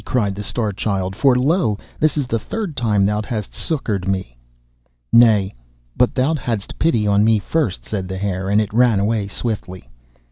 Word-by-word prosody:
cried 105 -6 0
the 100 - -6
Star 105 +1 -1
Child, 95 -1 -2
'for 135 +1 +4
lo! 135 - +1 0.2
this 155 0 +2
is 145 - 0
the 115 -2 -1
third 200 - -5
time 105 -5 +2
thou 105 +1 0
hast 105 -1 -5
succoured 105 - -3
me.' 95 -11 -2 0.8
'Nay, 110 -5 +5 0.4
but 125 - +2
thou 135 +4 +2
hadst 115 -8 -4
pity 135 -10 +2
on 100 0 +3
me 110 0 +4
first,' 115 - -2
said 95 -3 -4
the 95 0 -5
Hare, 95 -1 -2
and 100 +1 +3
it 105 -1 -2
ran 120 -3 +4
away 105 0 0
swiftly. 100 -3 -5
105 Hz, 180 wpm, -20 LUFS, 100-125 Hz, 0.8 s, Nay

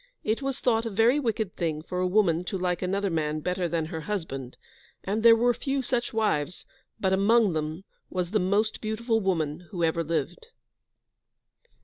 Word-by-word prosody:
It 220 +5 0
was 270 -1 -3
thought 230 -2 +1
a - - -2
very 225 +7 +3
wicked 220 -6 -2
thing 155 -3 -2
for 180 +2 -4
a 185 - +2
woman 180 -4 +2
to 190 - -3
like 180 -1 -1
another 195 +1 0
man 155 -1 -1
better 180 +2 -1
than 165 -1 -1
her 160 0 -5
husband, 150 -10 -5 0.5
and 205 +3 -1
there 230 0 +8
were 240 +2 +3
few 270 +2 -2
such 245 -1 -1
wives, 200 -8 -1 0.3
but 190 -1 +1
among 205 0 +4
them 155 +3 -3 0.3
was 180 -1 -2
the 215 - +2
most 205 +4 +1
beautiful 225 +1 0
woman 170 -4 -1
who 175 -1 -3
ever 165 +1 +1
lived. 170 - -3
190 Hz, 175 wpm, -27 LUFS, 165-225 Hz, 0.5 s, there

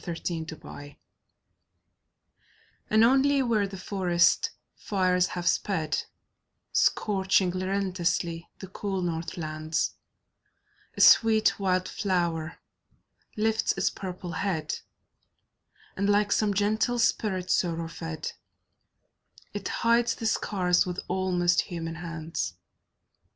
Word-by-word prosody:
FIRE 170 -2 -4
FLOWERS 160 -4 -6 1.9
And 220 +1 +5
only 270 +3 +4
where 220 -5 +1
the 195 0 -8
forest 185 - +2 0.3
fires 185 -2 +1
have 175 -1 -5
sped, 160 -7 0 0.7
Scorching 190 -2 +2
relentlessly 185 -3 -1
the - - -8
cool 190 0 -3
north 170 +1 -3
lands, 155 -1 -2 1.0
A - - +1
sweet 220 -2 +6
wild 185 -2 +1
flower 170 -4 -1 0.8
lifts 220 +1 +1
its - - +1
purple 180 -2 -6
head, 165 -5 -2 1.2
And, 200 +1 0
like 205 0 +3
some 205 -2 +2
gentle 215 +4 +1
spirit 190 -5 0
sorrow 165 -2 0
fed, 165 -1 -5 1.2
It 205 -1 -4
hides 235 0 +2
the 225 - -6
scars 180 -5 +2
with 180 0 -3
almost 180 -2 +2
human 165 -2 -5
hands. 160 - -4
185 Hz, 100 wpm, -27 LUFS, 170-205 Hz, 1.9 s, sweet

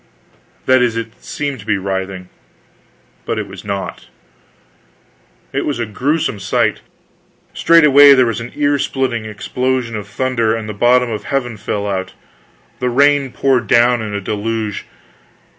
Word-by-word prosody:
That 130 -1 +4
is, 120 -2 +1
it 115 0 -7
seemed 140 -3 -4
to 100 - -12
be 105 -2 +1
writhing, 95 -1 -4 0.9
but - - -3
it - - -2
was - - -11
not. 100 -1 -5 1.5
It - - -1
was 145 - -2
a 120 - -2
grewsome 130 +2 -1
sight. - - 0 0.7
Straightway 145 -4 +7
there 130 -1 +4
was 115 -1 -2
an 115 - -7
ear 145 -1 +1
splitting 130 -5 -2
explosion 120 +3 -2
of 105 -1 -6
thunder, 115 0 0
and 110 -1 -5
the 105 - -5
bottom 120 +3 +3
of 105 -2 -5
heaven 125 -4 -2
fell 105 0 -3
out; 95 -2 -3 0.6
the 125 - 0
rain 140 +1 +3
poured 130 -4 +1
down 120 +2 +4
in 105 -2 -4
a 100 - -3
deluge. 110 +1 -3
115 Hz, 150 wpm, -17 LUFS, 105-130 Hz, 1.5 s, Straightway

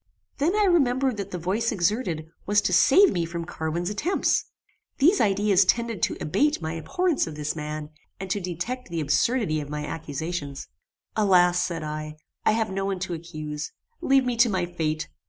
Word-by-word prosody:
Then 330 +8 +2
I 425 - +3
remembered 270 - +2
that 200 -1 -4
the 180 - -4
voice 195 +7 -1
exerted, 180 -4 0 0.2
was 205 +1 +4
to 190 -2 0
save 370 - +6
me 175 - 0
from 170 0 -4
Carwin's 170 +3 -3
attempts. 310 - +1 0.5
These 345 +8 +4
ideas 200 -1 +4
tended 230 0 0
to - - 0
abate 290 - +1
my 160 -1 -4
abhorrence 340 - 0
of 155 - -7
this 150 +1 -3
man, 150 0 -5 0.3
and 195 - -5
to 205 - 0
detect 185 +8 -4
the 170 -1 -3
absurdity 155 - +1
of 145 - -8
my 150 0 -4
accusations. 150 -1 -5 0.5
"Alas!" 180 -4 +4
said 170 -3 -3
I, 155 0 -5 0.3
"I - - +4
have 220 -2 0
no 195 0 -2
one 195 -1 -1
to 185 -2 -3
accuse. 155 -2 -6 0.3
Leave 270 -5 +3
me 250 -1 0
to 235 0 +5
my 185 -3 0
fate. 160 -3 -2
180 Hz, 180 wpm, -25 LUFS, 160-230 Hz, 0.5 s, save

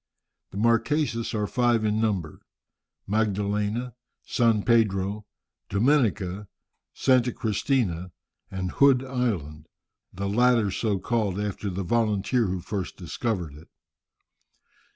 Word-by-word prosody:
The - - -9
Marquesas 115 +2 +1
are 105 -1 0
five 120 0 +1
in 105 +1 +1
number, 95 -8 -1 0.7
Magdalena, 105 +3 -1 0.3
San 115 -4 +2
Pedro, 105 -3 +1 0.4
Dominica, 105 -5 +1 0.4
Santa 125 -2 +2
Cristina, 105 -6 -1 0.4
and 95 -1 -4
Hood 135 -2 +4
Island, 95 - -3 0.4
the 100 +2 -4
latter 115 -1 +3
so 105 -1 0
called 105 -2 -1
after 105 0 -3
the 95 +1 -3
volunteer 110 +3 +1
who 90 -1 -3
first 95 -1 -5
discovered 90 -2 -3
it. 75 +3 -14
105 Hz, 105 wpm, -26 LUFS, 95-120 Hz, 0.7 s, Hood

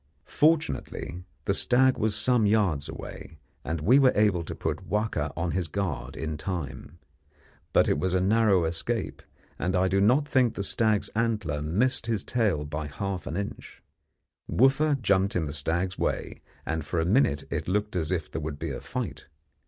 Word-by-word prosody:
Fortunately, 150 - 0 0.2
the - - +2
stag 130 +1 +3
was 110 -1 0
some 110 0 +2
yards 95 -9 +1
away, 80 - -9 0.3
and 80 -1 -3
we 125 - +5
were 130 -2 +6
able 105 -5 +3
to - - -6
put - - -4
Wahka 105 -8 -1
on 85 0 -1
his 90 -3 -1
guard 75 -8 -3
in 80 -1 -3
time. 80 -2 -5 0.7
But - - +4
it - - +1
was 95 +3 0
a - - +3
narrow 100 -2 +3
escape, 95 +7 -2 0.4
and 90 +2 0
I 90 +1 +3
do 95 +1 +2
not 130 +8 +4
think 130 -5 +2
the 100 - -2
stag's 110 0 +1
antler 105 -10 -1
missed 110 +11 0
his 110 -4 -1
tail 105 -11 0
by 75 +1 -4
half 90 +6 -4
an 80 - -3
inch. 100 0 -6 0.7
Wooffa 135 +3 +3
jumped 100 -1 +2
in 85 -3 +1
the 70 - -5
stag's 85 +5 -1
way, - - -2 0.2
and 80 0 -2
for 85 - -2
a 80 - +1
minute 85 - +2
it - - -2
looked 105 +2 -1
as 80 -2 -1
if 85 -4 -2
there - - -3
would 75 -1 -4
be - - -4
a - - -5
fight. - - -5
95 Hz, 180 wpm, -27 LUFS, 80-110 Hz, 0.7 s, were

